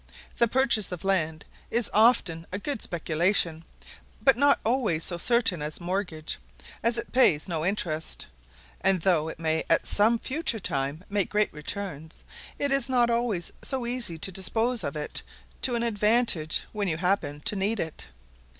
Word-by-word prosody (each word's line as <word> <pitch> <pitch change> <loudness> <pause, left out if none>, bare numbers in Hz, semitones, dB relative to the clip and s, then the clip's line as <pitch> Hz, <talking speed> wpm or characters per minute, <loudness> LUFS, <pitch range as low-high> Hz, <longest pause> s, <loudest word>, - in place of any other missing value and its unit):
The 235 - +5
purchase 235 -5 +2
of 180 0 -6
land 160 -5 0 0.2
is 235 -1 +1
often 205 -7 +3
a 185 - -2
good 255 +3 -3
speculation, 165 0 +1 0.6
but 270 -3 +5
not 285 +3 +3
always 220 -9 0
so 175 -2 -1
certain 225 -7 +2
as 150 0 -5
mortgage, 175 -3 -3 0.4
as 230 +1 +4
it 235 - -3
pays 200 - +4
no 165 -4 -2
interest; 170 -4 -2 0.6
and 190 -2 +3
though 160 -3 +2
it - - -7
may 160 0 0
at - - +3
some 220 +3 +3
future 260 -2 -2
time 140 -1 -3
make 200 -2 0
great 210 0 +1
returns, 160 0 -6 0.3
it 285 -1 +1
is 275 -1 +5
not 240 -2 +3
always 230 -7 -1
so 260 -3 -1
easy 235 -8 -2
to 190 - -2
dispose 225 +5 0
of 140 -1 -4
it 150 -1 -3 0.4
to 245 - +5
an 235 - -1
advantage 215 -7 +2
when 205 -2 -2
you 160 -3 -1
happen 165 -5 -1
to 210 - -1
need 205 +3 0
it. 160 -1 -5
195 Hz, 165 wpm, -26 LUFS, 160-235 Hz, 0.6 s, The